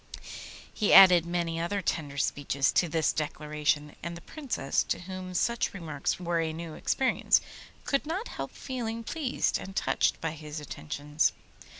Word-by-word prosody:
He 210 - +2
added 180 -3 +9
many 170 -1 -1
other 175 +5 -1
tender 150 -6 -2
speeches 140 -1 +1
to 175 - +2
this 160 0 +1
declaration, 150 -1 -1
and 170 +1 -5
the - - -11
Princess, 270 - -1
to - - -2
whom 185 0 -7
such 235 +1 0
remarks 155 -6 -2
were 175 -1 0
a 160 -1 0
new 165 0 -6
experience, 260 +10 +2 0.5
could 275 +1 0
not 375 +9 -3
help - - -5
feeling 230 -3 -5
pleased 285 0 -1
and 195 - -9
touched - - +1
by 160 - -2
his 155 -1 -7
attentions. 145 - -1
170 Hz, 155 wpm, -29 LUFS, 150-195 Hz, 0.5 s, added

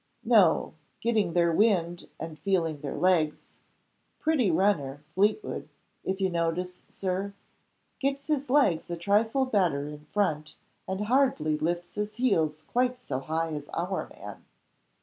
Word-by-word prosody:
"No. - - +4 0.3
Getting 215 -7 +1
their 170 -1 +3
wind, 175 -3 +1
and 160 -1 -7
feeling 165 -7 0
their 140 - -4
legs. 170 -4 +2 0.8
Pretty 305 -10 +2
runner, 160 -6 +1
Fleetwood 210 - 0 0.3
if 190 +1 -2
you 190 - +2
notice 175 +2 -1
Sir? 195 +1 -3 0.6
Gets 275 0 -1
his 290 -3 -1
legs 250 - +3
a 170 - -3
trifle 220 +8 +2
better 175 - +1
in 150 0 -9
front, 155 -5 -1 0.3
and 190 +1 -2
hardly 225 - +2
lifts 175 +3 -2
his 210 0 -3
heels 160 -11 +1
quite 250 +4 0
so 140 - -3
high 160 +3 -2
as 145 -1 -6
our 180 +3 -2
man. - - -9
180 Hz, 135 wpm, -28 LUFS, 160-215 Hz, 0.8 s, No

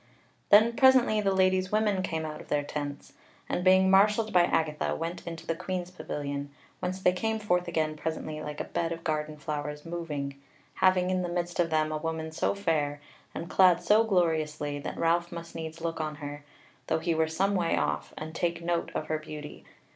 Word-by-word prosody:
Then 220 +3 +6
presently 260 -5 +5
the 195 -1 +2
Lady's 185 0 +2
women 210 -3 +2
came 160 -3 -2
out 155 -1 -6
of - - -14
their 145 0 0
tents, 145 -1 -5 0.3
and, 180 - -1
being 190 0 +6
marshalled 210 +3 +4
by 175 -1 +6
Agatha, 155 -3 0
went 170 +2 -5
into 165 -1 -6
the - - 0
Queen's 180 0 -4
pavilion, 145 -5 -4 0.3
whence 185 +1 -3
they 180 - +4
came 220 +4 -1
forth 180 -5 0
again 155 -2 0
presently 155 0 -4
like 150 -1 -6
a - - -1
bed 165 -1 -2
of 165 0 -5
garden 155 -1 -2
flowers 150 -1 -4
moving, 150 -5 -4 0.3
having 185 -1 +3
in 185 0 +1
the 175 - -2
midst 175 0 -3
of 170 -1 +3
them 155 -1 +1
a 155 - -1
woman 160 0 -3
so 160 - 0
fair, 150 -7 0 0.4
and 165 - -4
clad 180 -2 +5
so 215 +2 +5
gloriously, 155 -7 0
that 145 - -6
Ralph 170 +1 +1
must 170 -1 -8
needs 160 0 -6
look 165 -1 -2
on 155 -1 -3
her, 145 -1 -7 0.4
though 160 - +2
he 165 +1 0
were 160 0 +2
some 190 +5 0
way 170 - +1
off, 75 -1 -1
and 155 +1 -6
take 170 0 -1
note 170 0 0
of - - -1
her 155 0 -1
beauty. 150 -1 -9
165 Hz, 200 wpm, -29 LUFS, 155-185 Hz, 0.4 s, Then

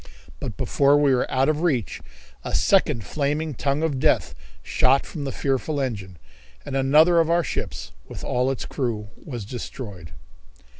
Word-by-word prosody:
But - - -5
before 140 +1 +3
we 145 -2 +4
were 125 - +1
out 130 +1 +2
of 155 0 +1
reach 130 - 0 0.4
a - - -3
second 110 -4 +2
flaming 150 +3 -1
tongue 140 +4 -1
of 145 -5 0
death - - +2 0.3
shot 135 +2 +3
from 145 -4 -6
the 135 - -2
fearful 140 +3 -1
engine, 100 -9 -4 0.5
and - - -5
another 155 +6 +5
of 165 -1 +2
our 170 0 +3
ships, - - -4 0.2
with - - -9
all 125 +1 0
its 135 - -3
crew, 115 -6 -3
was 120 -8 -6
destroyed. 105 - -7
135 Hz, 160 wpm, -24 LUFS, 120-150 Hz, 0.5 s, another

